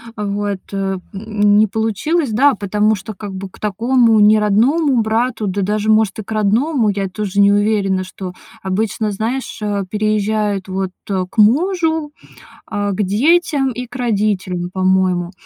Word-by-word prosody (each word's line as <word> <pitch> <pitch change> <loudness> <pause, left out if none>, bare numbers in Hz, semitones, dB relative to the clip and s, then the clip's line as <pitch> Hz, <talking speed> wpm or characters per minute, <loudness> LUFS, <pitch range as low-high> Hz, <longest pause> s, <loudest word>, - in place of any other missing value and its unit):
А 210 - -4
вот, 205 -1 -2
э, 195 -1 -2 0.2
м, 205 0 +1
не 215 0 +4
получилось, 225 - -1
да, 270 +5 +4
потому 210 +1 +1
что 210 +3 -8
как 200 0 -8
бы 190 0 -6
к - - -19
такому 225 +2 +2
неродному 225 +7 +3
брату, 220 0 -1
да 200 +2 -2
даже, 210 +2 0
может, 215 -1 +2
и - - -4
к 220 - -12
родному, 220 +4 +1
я 195 -1 -2
тоже 200 0 -3
не 200 0 +5
уверена, 205 -2 +1
что 185 -1 -8 0.3
Обычно, 210 +2 -1
знаешь, 230 +5 -3
а, 205 -1 -1
переезжают, 210 -1 -1
вот, 190 0 -3 0.2
э, 185 -2 0
к 235 - -22
мужу, 320 - +2 0.6
а, 205 0 -2
к 195 - -2
детям 275 - +2
и 250 +1 -5
к 245 - -14
родителям, 200 -7 -1
по-моему. 185 -2 +1
210 Hz, 160 wpm, -17 LUFS, 195-225 Hz, 0.6 s, не